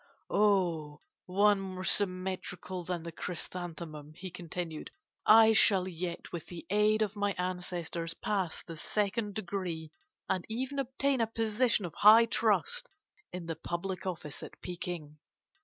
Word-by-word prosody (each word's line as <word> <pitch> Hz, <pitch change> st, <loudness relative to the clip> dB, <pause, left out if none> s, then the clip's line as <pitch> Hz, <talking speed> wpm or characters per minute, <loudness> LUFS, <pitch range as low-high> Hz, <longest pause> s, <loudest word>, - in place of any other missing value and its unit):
'O 175 Hz, -8 st, +2 dB, 0.3 s
one 200 Hz, +2 st, +4 dB
more 185 Hz, -1 st, -5 dB
symmetrical 185 Hz, -1 st, -1 dB
than 175 Hz, -1 st, -3 dB
the 170 Hz, -, -6 dB
chrysanthemum,' 160 Hz, -3 st, -6 dB
he 185 Hz, +1 st, -7 dB
continued, 170 Hz, -2 st, -5 dB, 0.4 s
'I 225 Hz, 0 st, +8 dB
shall 195 Hz, -4 st, +5 dB
yet, 175 Hz, -1 st, -5 dB
with 170 Hz, -3 st, -6 dB
the 175 Hz, -2 st, -8 dB
aid 210 Hz, +1 st, +4 dB
of 210 Hz, 0 st, -3 dB
my 205 Hz, -1 st, 0 dB
ancestors, 180 Hz, -2 st, -3 dB
pass 190 Hz, -6 st, -1 dB
the 165 Hz, -, -8 dB
second 205 Hz, +4 st, -1 dB
degree, 180 Hz, -6 st, -3 dB, 0.4 s
and 185 Hz, -2 st, 0 dB
even 260 Hz, +5 st, -2 dB
obtain 270 Hz, 0 st, +1 dB
a 225 Hz, -, +2 dB
position 225 Hz, -1 st, +1 dB
of 170 Hz, -, -6 dB
high 220 Hz, +3 st, +8 dB
trust 230 Hz, -, +1 dB, 0.4 s
in 180 Hz, -1 st, -5 dB
the 165 Hz, -1 st, -3 dB
public 185 Hz, +3 st, -4 dB
office 160 Hz, -5 st, -5 dB
at -, -, -10 dB
Peking. 175 Hz, -4 st, -6 dB
185 Hz, 140 wpm, -31 LUFS, 170-210 Hz, 0.4 s, I